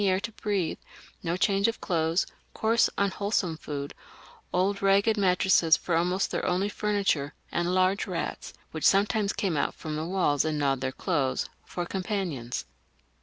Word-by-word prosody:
air 190 -1 +3
to 230 - -5
breathe, 205 -6 -2 0.4
no 170 0 -1
change 195 +2 +3
of 230 - -2
clothes, 165 0 +1 0.3
coarse 225 +1 +3
unwholesome 200 -3 0
food, 145 -2 -5 0.6
old 195 +2 +1
ragged 200 +3 +4
mattresses 180 -4 +4
for 175 - -1
almost 180 +3 +1
their - - -2
only 185 +3 +1
furniture, 200 -10 0 0.2
and 175 +1 0
large 185 +2 +2
rats, 180 -3 -4 0.2
which 155 - -6
sometimes 205 +1 +3
came 190 -5 -1
out 145 - 0
from 155 -1 -5
the 155 +1 -2
walls 175 -6 +2
and 155 -1 -1
gnawed 135 -3 +1
their 130 0 -1
clothes, 140 -4 -1 0.2
for 175 - -4
companions. 180 - -3
185 Hz, 155 wpm, -28 LUFS, 160-200 Hz, 0.6 s, ragged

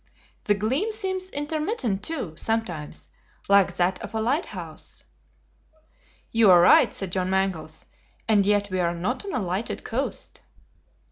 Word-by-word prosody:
The 205 - +3
gleam 260 - 0
seems 380 -3 -3
intermittent 295 - -2
too, 255 - -3
sometimes, 165 - -3 0.4
like 200 -1 +4
that 180 +1 +1
of - - -7
a - - +1
lighthouse." 265 +10 -3 1.3
"You 225 -3 +5
are 180 -1 +8
right," 175 - +6
said 195 -3 -3
John 185 0 -1
Mangles, 190 -5 -1 0.4
"and 210 -3 +4
yet 205 0 +1
we 185 - -1
are 170 -1 +1
not 190 - -2
on 395 - -4
a - - 0
lighted 190 +2 -3
coast." 260 +5 -4
205 Hz, 140 wpm, -25 LUFS, 185-270 Hz, 1.3 s, are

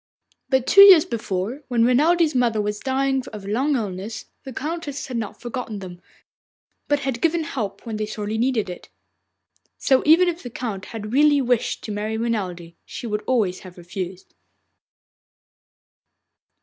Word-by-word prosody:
But 265 -2 +2
two 395 - +7
years 380 -6 +9
before, 220 +3 -3
when 235 -2 +2
Renelde's 315 +6 +3
mother 240 -4 +1
was 210 0 -2
dying 270 0 0
of 210 -2 -8
a - - -8
long 265 +8 +1
illness, 205 -1 -4 0.2
the 265 - -6
Countess 290 +1 -4
had 250 -3 -4
not 220 -3 -5
forgotten 240 -3 -5
them, 180 -2 -9 0.9
but 290 -1 +1
had 265 -4 -3
given 330 0 +2
help 210 -9 -5
when 225 -2 -4
they 215 0 -2
sorely 215 +1 -4
needed 240 -4 +1
it. 180 - -9 0.9
So 265 -1 +3
even 330 +4 +6
if 345 0 -2
the 245 - -7
Count 220 -5 -5
had 220 -1 -7
really 290 +1 +5
wished 245 -3 0
to 215 - -5
marry 210 +2 -3
Renelde, 185 -7 -3
she - - -8
would 210 -2 -2
always 215 -8 +1
have 185 -1 -13
refused. 180 +1 -7
235 Hz, 160 wpm, -23 LUFS, 205-270 Hz, 0.9 s, years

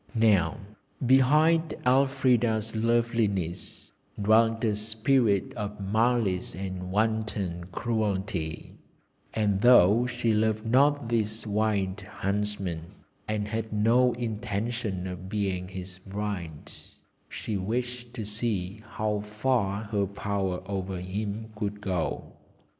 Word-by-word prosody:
Now 100 -8 +3 0.5
behind 150 +6 +4
Elfrida's 125 -4 +2
loveliness 110 -6 -1 0.3
dwelt 115 +2 +3
a 110 -2 +2
spirit 110 0 +1
of 105 -2 -5
malice 105 -3 +1
and 95 -1 -5
wanton 105 -4 -1
cruelty, 95 -5 -2 0.6
and 100 -3 +1
though 120 -1 +6
she 120 -2 0
loved 110 0 +1
not 140 +2 +3
this 110 -1 -1
wild 105 -2 0
Huntsman, 100 -3 -3 0.5
and 105 -1 -1
had 110 +1 -3
no 115 +4 +4
intention 110 -3 -3
of 90 0 -6
being 95 -3 -1
his 95 0 -8
bride, 95 -6 -5 0.6
she 110 - -4
wished 120 +5 -3
to 110 -4 -4
see 105 -2 -3
how 105 -1 0
far 105 -1 0
her 100 -2 -1
power 100 -2 -2
over 95 -1 -3
him 105 +4 -4
could 105 -1 -3
go. 90 -5 -3
105 Hz, 105 wpm, -28 LUFS, 95-115 Hz, 0.6 s, though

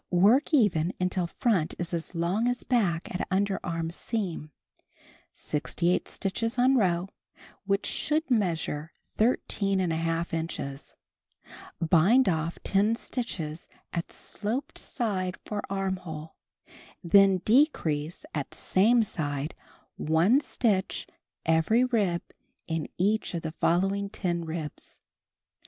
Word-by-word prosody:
Work 210 - +4
even 190 - +3
until 180 -1 0
front 185 -4 0
is 175 0 -4
as 170 +2 -3
long 180 +8 +1
as 245 0 -1
back 190 -11 0
at 180 - -3
underarm 180 -4 -1
seam 180 -8 -3 0.8
(68 170 +4 -1
stitches 230 +5 -2
on 255 +2 +4
row, 180 -6 +2 0.6
wliich 200 +1 +1
should 310 -1 -1
measure 165 -7 0 0.3
13| 180 -7 0
inches). 160 -4 -4 0.8
Bind 180 +11 +4
off 165 -1 0
10 205 +3 +2
stitches 175 -11 -4 0.3
at 170 -1 -3
sloped 240 +7 -4
side 190 -7 -2
for 210 -1 -3
armhole, 185 -5 -4 0.7
then 195 +2 +6
decrease 175 - +2
at - - -4
same 225 +5 +3
side 145 -6 -3 0.4
one 165 - +3
stitch 200 -9 0 0.4
every 165 +9 +3
rib 205 -9 +1 0.4
in 160 -2 -3
each 205 +1 +1
of 165 - -3
the 160 - -3
following 195 +5 +1
10 175 -4 -2
ribs. 160 -2 -6
185 Hz, 105 wpm, -28 LUFS, 165-215 Hz, 0.8 s, then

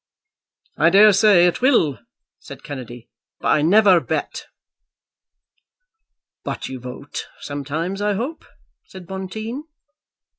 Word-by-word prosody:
"I 160 +2 +4
daresay 200 -1 +6
it 175 +7 0
will," 170 - +2 0.4
said - - -12
Kennedy, 125 -4 -9 0.3
"but - - -2
I 150 - +3
never 190 +2 +5
bet." - - -4 2.0
"But - - -5
you 130 -1 -7
vote 125 +3 -8
sometimes, 155 +7 -4
I 210 0 +1
hope," 255 +11 -4 0.4
said 190 -2 -12
Bonteen. 215 - -6
185 Hz, 105 wpm, -21 LUFS, 145-210 Hz, 2.0 s, daresay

